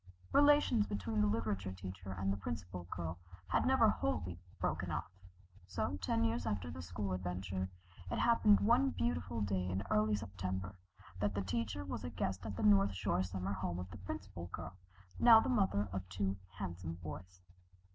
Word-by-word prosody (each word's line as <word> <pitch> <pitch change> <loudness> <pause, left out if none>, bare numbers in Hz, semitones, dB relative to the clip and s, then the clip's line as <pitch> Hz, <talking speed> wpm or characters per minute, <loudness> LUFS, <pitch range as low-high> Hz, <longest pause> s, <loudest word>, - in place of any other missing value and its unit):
Relations 285 -7 +5
between 105 +2 -1
the 105 - +4
literature 100 -3 -1
teacher 95 +1 -7
and 95 +1 0
the - - -3
Principal 90 -1 -5
Girl 85 -1 -4 0.3
had - - +2
never - - +6
wholly 90 -1 -1 0.2
broken - - -1
off, - - -3 0.6
so 90 0 -2
ten 115 +5 +1
years 115 +1 0
after 95 -6 -2
the 85 +1 -6
school 90 +3 -3
adventure 95 +1 -3 0.4
it - - -1
happened 220 -3 +5
one 245 +6 +4
beautiful 180 - -1
day 95 -2 0
in 95 +2 -1
early 105 0 +3
September 95 -1 -4 0.4
that 100 0 0
the 100 - 0
teacher 100 -1 -2
was 90 - -4
a - - -3
guest 95 -1 -2
at 100 - -4
the - - -2
North 100 -2 +5
Shore 90 -1 +1
summer 95 +1 -2
home 90 -2 -2
of 90 +1 -6
the - - -8
Principal 95 -2 -6
Girl, 90 +1 -7 0.4
now 230 -2 +9
the 245 - 0
mother 190 - +2
of 95 -1 -4
two 95 +1 -1 0.2
handsome 85 -3 -4
boys. 90 +3 -8
95 Hz, 175 wpm, -36 LUFS, 90-105 Hz, 0.6 s, now